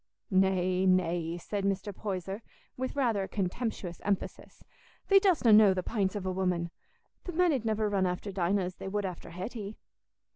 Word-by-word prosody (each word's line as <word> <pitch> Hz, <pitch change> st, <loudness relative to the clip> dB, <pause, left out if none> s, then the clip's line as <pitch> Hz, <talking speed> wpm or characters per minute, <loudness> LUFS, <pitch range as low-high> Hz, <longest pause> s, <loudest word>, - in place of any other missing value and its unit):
"Nay, 185 Hz, -1 st, +2 dB
nay," 175 Hz, -2 st, +1 dB
said 200 Hz, +3 st, -4 dB
Mr. 195 Hz, 0 st, -1 dB
Poyser, 195 Hz, 0 st, -4 dB, 0.3 s
with 260 Hz, +1 st, -4 dB
rather 235 Hz, -7 st, +1 dB
a 190 Hz, -, -3 dB
contemptuous 195 Hz, -2 st, -3 dB
emphasis, 200 Hz, -1 st, -3 dB, 0.5 s
"thee 395 Hz, 0 st, +8 dB
dostna 350 Hz, -, +4 dB
know 210 Hz, -3 st, +7 dB
the 185 Hz, -, -1 dB
pints 200 Hz, -3 st, -1 dB
of 200 Hz, -2 st, -4 dB
a 185 Hz, -, 0 dB
woman. 180 Hz, -2 st, -1 dB, 0.5 s
The 355 Hz, -, -5 dB
men 350 Hz, 0 st, +3 dB
'ud 250 Hz, -5 st, -2 dB
niver 215 Hz, -1 st, +1 dB
run 195 Hz, -2 st, +1 dB
after 180 Hz, +3 st, -3 dB
Dinah 190 Hz, +1 st, +1 dB
as 180 Hz, 0 st, -4 dB
they -, -, -7 dB
would 205 Hz, +1 st, -1 dB
after 180 Hz, -3 st, -6 dB
Hetty." 200 Hz, +4 st, -6 dB
195 Hz, 175 wpm, -30 LUFS, 185-215 Hz, 0.5 s, thee